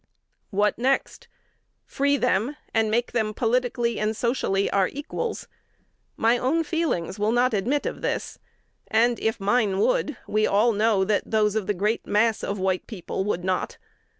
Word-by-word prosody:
What 205 +2 +1
next? 265 +3 0 0.6
Free 280 +1 +1
them, 235 +5 0 0.2
and 225 -1 +2
make 235 +3 0
them 215 -3 -1
politically 240 0 0
and 215 0 -1
socially 230 -5 0
our 195 -2 +3
equals? 300 +11 -5 0.7
My 230 +2 +3
own 305 +7 +1
feelings 295 - -2
will 210 +1 +1
not 245 +1 +2
admit 240 +9 0
of - - -4
this; - - -3 0.5
and, 235 +2 +2
if 220 0 -1
mine 205 -1 +1
would, 305 - +1
we 215 0 +1
all 215 +4 +3
know 210 -2 +2
that 205 +1 0
those 210 -2 +2
of 215 -3 -2
the 210 - 0
great 210 +5 -1
mass 220 +1 +2
of 200 - -2
white 190 -1 -1
people 190 -2 -4
would 180 -4 -1
not. 185 0 -2
220 Hz, 160 wpm, -25 LUFS, 205-245 Hz, 0.7 s, our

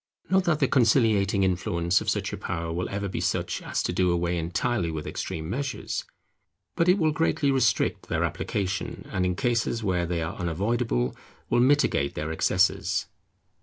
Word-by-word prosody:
Not 190 -1 +3
that 170 -3 +2
the 140 - +2
conciliating 110 -6 +3
influence 85 -1 +1
of - - -2
such - - -1
a - - -3
power 85 -1 -3
will 90 +2 -2
ever 100 +1 -3
be 95 - -4
such - - -1
as - - -2
to - - -1
do 90 0 +2
away 85 0 0
entirely 85 +4 -1
with 80 -2 -4
extreme 80 -1 -4
measures; 135 +8 -3 0.7
but 165 +1 +2
it 185 - +5
will 160 -4 +2
greatly 150 -2 +1
restrict 125 -7 +1
their - - 0
application, 95 -1 -3
and 90 -1 0
in 90 - -1
cases 115 0 0
where 90 -4 0
they 85 -1 -1
are 80 - -5
unavoidable, 90 - -1 0.4
will 120 - +4
mitigate 125 - +3
their 80 +1 -3
excesses. 90 +3 +1
95 Hz, 170 wpm, -26 LUFS, 85-120 Hz, 0.7 s, it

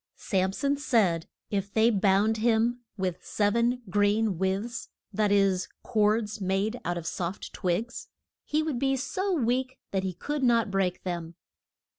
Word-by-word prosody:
Sam 190 -2 0
son 280 +7 0
said 210 - +2 0.2
if 200 -1 -1
they 220 +3 +4
bound 205 +1 +3
him 230 +2 +2 0.2
with 185 -2 -2
sev 205 0 +1
en 240 +2 +1
green 205 0 +2
withes 195 +6 -2 0.2
that 210 +1 +2
is, 195 -2 +3 0.2
cords 215 -1 +1
made 195 +5 0
out 175 +1 -1
of 170 - -6
soft 175 +3 -4
twigs 210 +6 -2 0.4
he 305 +1 0
would 300 -6 -2
be 270 +1 +2
so 285 +10 -2
weak 260 -4 0
that 190 - 0
he 190 -2 -3
could 295 +7 -3
not 235 -5 +3
break 190 -2 0
them. 170 -2 -4
210 Hz, 155 wpm, -28 LUFS, 190-240 Hz, 0.4 s, they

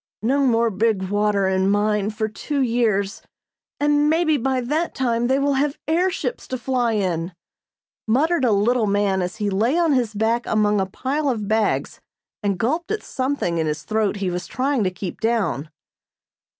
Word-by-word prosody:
"No 275 +5 +2
more 230 -1 +2
big 195 -2 0
water 205 -1 +1
in 190 0 +1
mine 205 0 +1
for 220 0 -2
two 280 +7 -4
years, 225 -4 0 0.6
and 295 0 +3
mebbe 315 -3 +2
by 265 -1 +1
that 300 +7 -1
time 240 -2 0
they 265 +2 +2
will 280 0 +1
have 290 0 -1
air 345 +4 +2
ships 470 +6 -4
to 255 - -3
fly 245 -2 0
in," 180 -4 -1 0.7
muttered 285 +7 +2
a 245 - +3
little 220 +3 +2
man 200 -1 +1
as 180 +3 -3
he 210 -2 -2
lay 225 - +1
on 335 -4 +3
his 240 -5 0
back 225 +3 0
among 210 -2 +2
a 190 - -1
pile 275 +8 -2
of 215 -5 -2
bags 220 0 0 0.4
and 200 -3 0
gulped 305 - -1
at 430 - -2
something 255 -11 -2
in 160 - 0
his 150 -1 -3
throat 215 -1 0
he 195 -3 -2
was 180 +1 -4
trying 265 -2 0
to - - +2
keep 180 0 -7
down. 220 -10 0
225 Hz, 180 wpm, -22 LUFS, 200-270 Hz, 0.7 s, and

